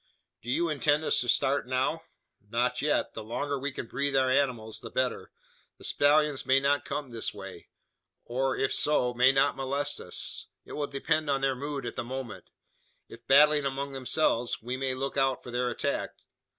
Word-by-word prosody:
"Do 120 - -8
you 170 +7 +1
intend 150 0 +2
us - - +2
to 120 - -3
start 135 +2 +2
now?" 130 +5 0 0.5
"Not 125 +2 0
yet. 150 +1 +1
The 110 - -6
longer 135 +6 -3
we 140 +2 -2
can 130 - -6
breathe 140 +4 -1
our 130 -1 +3
animals 125 -5 0
the - - -8
better. - - -1 0.5
The - - -16
stallions 145 -1 +3
may 135 +1 +4
not 140 +1 +1
come 140 -2 -4
this 115 -2 -2
way; 95 -3 -9 0.6
or 130 +2 -1
if 135 - 0
so, 125 -5 +2
may 125 +2 +5
not 135 0 +2
molest 140 +2 -2
us. - - -3 0.2
It - - -13
will 145 -1 -2
depend 150 +2 -1
on 135 -1 +1
their 135 -1 +2
mood 140 0 -4
at 120 - -5
the - - -3
moment. 120 -6 -7 0.6
If 115 0 -14
battling 150 +2 +6
among 140 +1 -4
themselves, 130 -2 0
we 125 +3 -4
may 130 0 -1
look 135 +2 -3
out 135 -1 +1
for 120 - -8
their 125 0 0
attack. - - -2
135 Hz, 190 wpm, -29 LUFS, 125-145 Hz, 0.6 s, battling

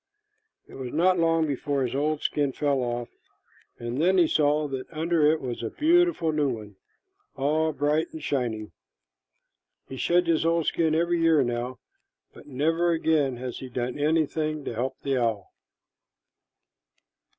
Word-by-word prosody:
It - - -16
was 130 -2 -6
not 180 +3 +3
long 165 -1 +2
before 140 -1 -1
his 125 - -2
old 150 +2 -1
skin 145 -3 0
fell 140 -1 0
off, 120 -1 -3 0.7
and 120 +4 -3
then 185 +3 +3
he 170 -3 +5
saw 150 0 +2
that 135 -2 -6
under 160 -1 +2
it 160 - 0
was 125 -4 -5
a 115 - -3
beautiful 340 - +2
new 150 -2 +1
one, 105 -4 -6 0.6
all 155 +3 +1
bright 150 +2 0
and 160 - -7
shining. 115 -6 -2 1.2
He 130 - -8
sheds 175 +6 +2
his 165 -2 +2
old 165 -1 +1
skin 160 -2 +1
every 170 +1 +1
year 160 -3 +4
now, 120 +1 -3 0.6
but - - -15
never 165 +5 +1
again 160 -6 +1
has 125 0 -6
he 130 - -8
done 125 +2 -3
anything 155 -1 0
to - - -3
help 130 +4 -3
the 135 -1 0
owl. 115 -5 -2
150 Hz, 155 wpm, -26 LUFS, 130-160 Hz, 1.2 s, he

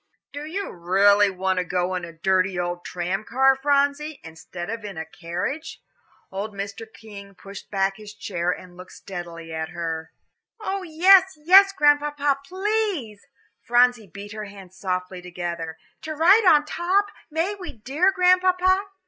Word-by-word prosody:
"Do 290 +1 -6
you 390 +5 -4
really 200 +4 +4
want 190 0 -1
to - - 0
go 180 0 -1
in 180 -1 -3
a 170 - -10
dirty 185 +3 0
old 175 0 -3
tram 180 +3 -3
car, 265 +4 +3
Phronsie, 285 +2 0
instead 165 +2 -9
of 225 +1 -5
in 200 -4 -7
a 160 - -4
carriage?" 180 - -5 0.5
Old 200 +2 -5
Mr. 200 +3 -7
King 200 -3 -12
pushed 195 +1 -11
back 195 -1 0
his 210 -1 -11
chair 180 -4 -3
and 180 0 -5
looked 180 +1 -12
steadily 170 -3 -8
at 160 0 -4
her. 165 -2 -5 0.5
"Oh, 395 -2 -3
yes, 370 +2 +5
yes, 380 +6 +7
Grandpapa, 290 -4 +2
please" 380 - -2 0.3
Phronsie 245 -2 +3
beat 200 +4 -10
her 215 -1 -6
hands 195 -2 -13
softly 185 -1 -4
together 170 -2 -5 0.2
"to 315 0 -5
ride 385 +8 +5
on 300 -3 +6
top; 370 +6 0 0.2
may 330 +6 -1
we, 385 -3 -8
dear 275 - +1
Grandpapa?" 370 +1 +3
210 Hz, 155 wpm, -23 LUFS, -, 0.5 s, yes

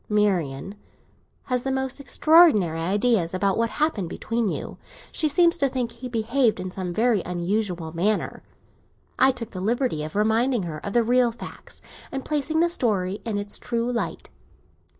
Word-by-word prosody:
Marian 195 -6 0 0.7
has 250 -1 -1
the 270 - -2
most 265 +1 -2
extraordinary 275 - +4
ideas 190 0 +1
about 195 +1 +1
what 230 0 +1
happened 225 - -1
between 230 +2 -2
you; - - -5 0.3
she 315 - +1
seems 340 +3 +4
to 275 -4 +2
think 250 -3 -2
he 245 +2 -8
behaved 235 +1 +1
in 185 0 -5
some 180 -1 -4
very 225 +1 +2
unusual 180 -2 -2
manner. 205 +5 0 0.8
I 265 - +6
took 235 -3 -7
the 185 - -6
liberty 230 - 0
of 155 +3 -7
reminding 220 +2 +2
her 155 -3 -6
of 200 - -4
the 240 - +4
real 245 +1 +3
facts, 230 - -10 0.3
and 270 -1 -5
placing 305 +2 0
the 345 - +3
story 205 - 0
in 220 -3 -2
its 205 0 -4
true 235 0 -2
light. 235 - -3
225 Hz, 165 wpm, -24 LUFS, 190-255 Hz, 0.8 s, I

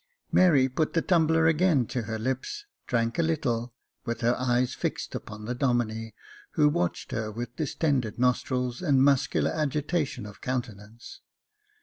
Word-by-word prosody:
Mary 155 -8 +5
put 150 +4 -1
the 165 - +2
tumbler 160 -2 +3
again 160 -4 +3
to 125 - -3
her 110 0 -4
lips, 130 - -3 0.2
drank 115 +4 0
a - - +5
little, 125 -8 -1 0.3
with 115 -1 -4
her 120 +1 +3
eyes 125 0 +1
fixed - - -3
upon 105 0 -7
the 120 - -2
Domine, 120 -3 -1 0.4
who 150 - +4
watched 90 -11 -2
her 110 0 -2
with 120 +2 -6
distended 140 -6 -1
nostrils 125 +1 0
and 140 -7 +3
muscular 140 -2 +2
agitation 150 -4 -1
of 105 0 -11
countenance. 115 -3 -6
125 Hz, 145 wpm, -27 LUFS, 115-150 Hz, 0.4 s, Mary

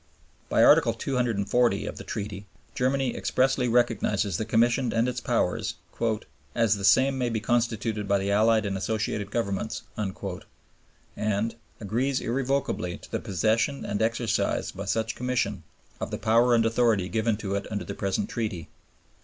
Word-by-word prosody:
By - - +4
Article - - +6
240 120 -3 +1
of - - -6
the - - -7
Treaty 105 -2 -5 0.3
Germany 130 0 0
expressly 130 -1 +1
recognizes 110 -5 +1
the 110 - -2
Commission 120 +3 +2
and 115 +2 +2
its 125 -1 -3
powers - - 0 0.8
"as 115 -3 +3
the 100 - -6
same 130 +6 +4
may 125 -1 +1
be 115 -1 -1
constituted 110 -2 0
by 100 0 +3
the 100 +1 -1
Allied 110 +1 +3
and 100 -1 -2
Associated 105 +1 -2
Governments," 100 -1 -2
and 100 -3 -3 1.6
"agrees 125 +6 0
irrevocably 130 -7 -1
to - - -15
the - - -1
possession 110 +8 0
and 100 +1 -2
exercise 115 0 0
by - - -7
such 110 0 -1
Commission 120 -7 -1 0.4
of - - -3
the - - -3
power 115 +2 +4
and 115 -1 +3
authority 115 -5 +2
given 110 +1 0
to 100 -2 -4
it 100 - -2
under 100 -4 -3
the - - -5
present 100 - -1
Treaty." 105 - -4
115 Hz, 155 wpm, -27 LUFS, 100-120 Hz, 1.6 s, Article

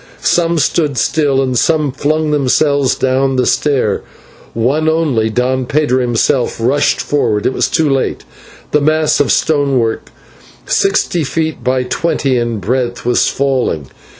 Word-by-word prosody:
Some 170 -1 +1
stood 150 -3 0
still 140 -3 +1
and 130 -1 -2
some 150 +2 +1
flung 150 +3 -1
themselves 140 -1 +1
down 130 +1 0
the 125 -1 +1
stair, 130 -9 0 0.5
one 140 +8 +1
only, 145 -9 0
Don 125 +3 -1
Pedro 140 -3 +1
himself, 120 +1 0
rushed 135 +6 +1
forward. 105 -8 -1
It - - +1
was - - 0
too 160 -2 +1
late; 135 -2 -1 0.5
the 150 - +2
mass 155 +1 +2
of 145 - +2
stonework, 140 -7 0 0.6
sixty 190 -3 +1
feet 160 +3 -2
long - - -19
by 130 0 0
twenty 135 0 -1
in 120 -1 -2
breadth, 120 +5 -2
was 120 0 +2
falling. 130 - -1
135 Hz, 145 wpm, -14 LUFS, 125-150 Hz, 0.6 s, the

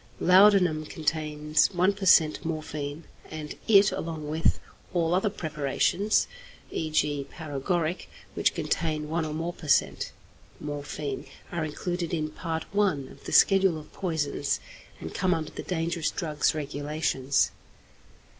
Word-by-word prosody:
Laudanum 180 -4 +5
contains 155 -1 0
1 185 +3 +3
per 195 -1 -4
cent. 155 -4 +5
morphine, 155 -1 -4 0.3
and 155 -1 -6
it, 200 -2 +6
along 160 -2 -4
with 155 +2 +1 0.4
all 170 -1 +2
other 190 +4 +2
preparations 160 +4 +1 0.5
(e.g., 150 -3 0
paregoric) 160 +3 -2 0.2
which - - +1
contain 155 -1 -1
1 165 0 0
or 155 - -4
more 165 +2 -3
per 160 - -11
cent. 145 - +2 0.5
morphine, 145 -1 -5 0.2
are 170 -2 -2
included 175 +3 -3
in 155 -1 -2
Part 160 0 -4
I. 205 0 +4 0.2
of - - -16
the - - -5
Schedule 195 -4 +5
of 155 -1 -12
Poisons, 150 -5 -1 0.4
and 80 - -7
come 180 -2 +2
under 160 -2 -4
the - - -6
Dangerous 170 -2 -1
Drugs 155 -4 0
Regulations. 145 -2 0
155 Hz, 130 wpm, -27 LUFS, 150-175 Hz, 0.5 s, it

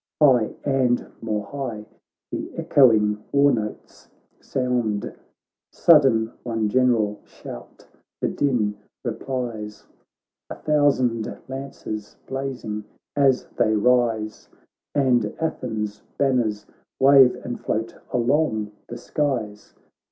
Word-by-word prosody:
High, 130 -7 +4
and 130 -3 +1
more 110 -2 -2
high, 120 -4 -5 0.5
the - - -4
echoing 105 -6 +4
war 140 0 +5
notes 110 -4 -5 0.3
sound: 120 -5 -1 0.6
Sudden 135 -9 +5
one 115 -3 -1
general 115 -4 +2
shout - - -11 0.3
the - - 0
din 110 -7 0 0.3
replies, 115 -3 -4 0.6
A - - -5
thousand 135 -7 +1
lances 130 -6 -6
blazing 130 -6 -4 0.3
as 135 -3 +3
they 110 - +3
rise, 110 -1 +1 0.5
And 125 -6 +2
Athens' 110 -10 -3 0.2
banners 120 -7 +1 0.3
wave 135 -2 +7
and 120 - -4
float 110 +1 -2 0.2
along 120 -4 +1 0.2
the 120 - -7
skies. 120 -6 -3
120 Hz, 95 wpm, -23 LUFS, 110-135 Hz, 0.6 s, wave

